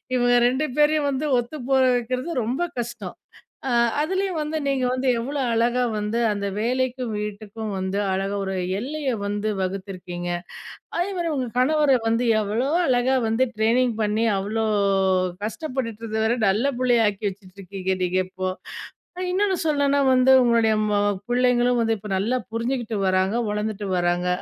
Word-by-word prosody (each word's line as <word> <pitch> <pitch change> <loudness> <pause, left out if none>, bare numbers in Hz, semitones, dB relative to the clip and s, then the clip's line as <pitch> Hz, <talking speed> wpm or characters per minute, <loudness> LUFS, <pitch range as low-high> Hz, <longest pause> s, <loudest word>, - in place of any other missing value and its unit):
இவங்க 245 0 +3
2 260 +5 0
பேரையும் 300 -1 +3
வந்து 275 +3 -2
ஒத்துப்போக 265 +1 0
வைக்கிறது 255 +5 -2
ரொம்ப 245 +8 -2 0.2
கஷ்டம். 240 0 -6 0.5
அ - - 0 0.3
அதுலயும் 375 +2 -1
வந்து 305 +1 -2
நீங்க 275 -2 0
வந்து 255 +1 -1
எவ்ளோ 280 +5 -3
அழகா 235 +2 +2 0.2
வந்து 210 +2 -1
அந்த 205 -1 -3
வேலைக்கும் 250 +1 -1
வீட்டுக்கும் 210 +1 -5
வந்து 190 +1 -2
அழகா 195 +1 -1
ஒரு 190 0 -3 0.3
எல்லைய 285 +4 -3 0.2
வந்து 205 +1 -2
வகுத்திருக்கீங்க. 185 -2 -5 0.7
அதே 355 +3 0
மாரி 340 -1 -1
உங்க 260 -3 -2
கணவர 290 0 +4
வந்து 230 +2 +1 0.2
எவ்ளோ 220 +6 -1 0.2
அழகா 255 +1 +2
வந்து 225 +4 +2
ட்ரைனிங் 235 +3 +2
பண்ணி 215 +2 +1
அவ்ளோ 215 +3 -1 0.8
கஷ்டப்பட்டுட்டு 230 -2 -4
இருந்தவர 220 +2 0
நல்ல 210 +7 +1
புள்ளையாக்கி 230 -5 +2
வச்சுட்டுருக்கீங்க 190 -1 -5
நீங்க 180 +1 +1
இப்போ. 185 0 -4 0.8
இன்னொன்னு 385 0 +1
சொல்லணும்னா 285 -2 +2
வந்து, 255 +1 +5
உங்களுடைய 230 -2 +3 0.2
ம - - 0 0.3
புள்ளைங்களும் 245 -1 +2
இப்ப 210 +1 -10
நல்லா 230 +7 0
புரிஞ்சுகிட்டு 235 0 -2
வராங்க, 185 +2 +1
வளர்ந்துட்டு 210 0 -3
வராங்க. 175 0 0
235 Hz, 135 wpm, -23 LUFS, 210-260 Hz, 0.8 s, வந்து